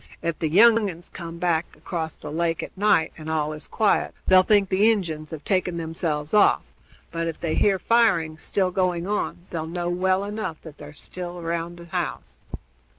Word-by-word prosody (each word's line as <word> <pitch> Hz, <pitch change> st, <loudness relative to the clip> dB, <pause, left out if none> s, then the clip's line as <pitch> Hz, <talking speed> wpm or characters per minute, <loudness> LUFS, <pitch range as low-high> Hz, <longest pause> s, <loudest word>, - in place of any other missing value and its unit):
Ef 170 Hz, -2 st, -2 dB
the 160 Hz, -, 0 dB
young 220 Hz, +4 st, +6 dB
uns 175 Hz, -1 st, -8 dB
come 170 Hz, -1 st, -7 dB
back 170 Hz, -2 st, 0 dB
across 160 Hz, -3 st, -4 dB
the 150 Hz, -, -8 dB
lake 165 Hz, +1 st, -1 dB
at -, -, -9 dB
night, 195 Hz, -5 st, +2 dB
and 155 Hz, 0 st, -7 dB
all 155 Hz, -1 st, 0 dB
is 155 Hz, -, -7 dB
quiet, 215 Hz, -2 st, +1 dB
they'll 185 Hz, 0 st, +7 dB
think 200 Hz, 0 st, +3 dB
the 200 Hz, +4 st, +4 dB
Injuns 160 Hz, -8 st, -3 dB
have 155 Hz, -3 st, -7 dB
taken 185 Hz, -2 st, 0 dB
themselves 160 Hz, -2 st, -2 dB
off; 210 Hz, -, +5 dB, 0.5 s
but, 165 Hz, 0 st, -2 dB
if 165 Hz, -, -4 dB
they 165 Hz, -2 st, -2 dB
hear 200 Hz, -2 st, +3 dB
firing 175 Hz, -7 st, +2 dB
still 185 Hz, +2 st, 0 dB
going 180 Hz, -2 st, 0 dB
on, 195 Hz, -3 st, -2 dB
they'll 160 Hz, -2 st, -3 dB
know 175 Hz, +1 st, -3 dB
well 185 Hz, +2 st, +1 dB
enough 205 Hz, -5 st, -4 dB
that 160 Hz, -2 st, -12 dB
they're 145 Hz, 0 st, -9 dB
still 175 Hz, +3 st, -7 dB
around 170 Hz, 0 st, -3 dB
the 170 Hz, -, -11 dB
house." 170 Hz, -, -4 dB
170 Hz, 190 wpm, -24 LUFS, 160-190 Hz, 0.5 s, they'll